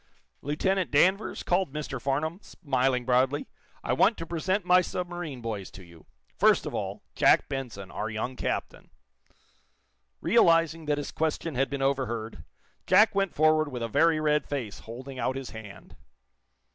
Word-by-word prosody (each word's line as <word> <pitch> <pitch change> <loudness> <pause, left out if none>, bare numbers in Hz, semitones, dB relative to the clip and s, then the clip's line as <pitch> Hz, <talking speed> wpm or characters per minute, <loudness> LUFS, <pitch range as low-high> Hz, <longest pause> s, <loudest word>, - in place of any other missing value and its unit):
"Lieutenant 185 +6 0
Danvers," 190 +8 +2
called 180 -3 +1
Mr. 140 -4 -5
Farnum, 150 +6 -1
smiling 130 -8 -1
broadly, 130 +3 +2 0.4
"I 125 - 0
want 205 - +3
to 165 - -5
present 175 +4 -1
my 180 0 +6
submarine 175 -7 -5
boys 105 -5 -5
to 95 - -11
you. 85 -2 -17 0.3
First - - +4
of - - -5
all, - - -4
Jack - - +4
Benson, 115 -8 -6
our 110 - -3
young 115 +4 -4
captain." - - -4 1.3
Realizing 165 -4 +3
that 150 -1 0
his 145 - -4
question 160 0 -2
had 135 +1 0
been 140 -1 -3
overheard, 120 -5 -2 0.4
Jack 220 +1 +6
went 195 -2 0
forward 155 0 +4
with 125 -2 -4
a - - -1
very 160 +7 +3
red 150 -1 +1
face, 125 -8 -4
holding 130 +3 -9
out 130 +2 -1
his 135 -1 -6
hand. 100 -4 -11
140 Hz, 155 wpm, -27 LUFS, 125-165 Hz, 1.3 s, my